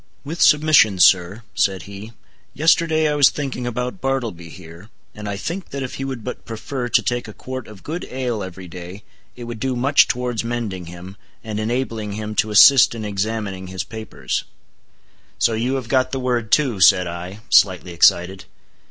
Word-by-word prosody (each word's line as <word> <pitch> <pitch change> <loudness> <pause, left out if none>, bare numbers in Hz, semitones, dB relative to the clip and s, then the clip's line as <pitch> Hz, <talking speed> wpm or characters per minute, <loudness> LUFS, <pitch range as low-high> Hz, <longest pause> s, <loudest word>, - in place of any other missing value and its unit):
"With 160 +4 -6
submission, 150 -9 +5
sir," 95 +4 +4
said 95 -2 0
he, 100 +3 -10 0.4
"yesterday 160 0 +3
I 150 - 0
was 145 -2 +6
thinking 135 -4 -4
about 125 +8 -4
Bartleby 115 -11 -3
here, 85 +3 -13 0.2
and 105 -1 -7
I 100 - -4
think 175 - -5
that 140 -1 -5
if 130 - -6
he 135 - -5
would 130 -4 -5
but 125 - -6
prefer 120 +3 -5
to - - +3
take 120 -1 -2
a 105 - -9
quart 130 +2 -7
of 105 -3 -14
good 165 +4 -5
ale 125 -4 -3
every 95 -1 -8
day, 90 +3 -10 0.3
it 120 - -9
would 120 -1 -7
do 130 +1 -1
much 140 +4 +4
towards 125 -2 -2
mending 115 -7 -4
him, 90 +3 -10 0.3
and 110 -1 -4
enabling 110 -2 -3
him 105 +1 -5
to 110 - +2
assist 120 +4 +7
in 110 -2 -5
examining 100 -2 -3
his 95 -1 -4
papers." 110 -2 -5 0.9
"So 115 - +2
you 120 +4 -1
have 130 -4 -4
got 130 +1 +1
the 135 - -2
word 120 -3 -2
too," 130 -9 +2
said 90 0 +6
I, 90 +4 -7
slightly 90 +2 +4
excited. 90 +2 +3
110 Hz, 180 wpm, -20 LUFS, 95-130 Hz, 0.9 s, assist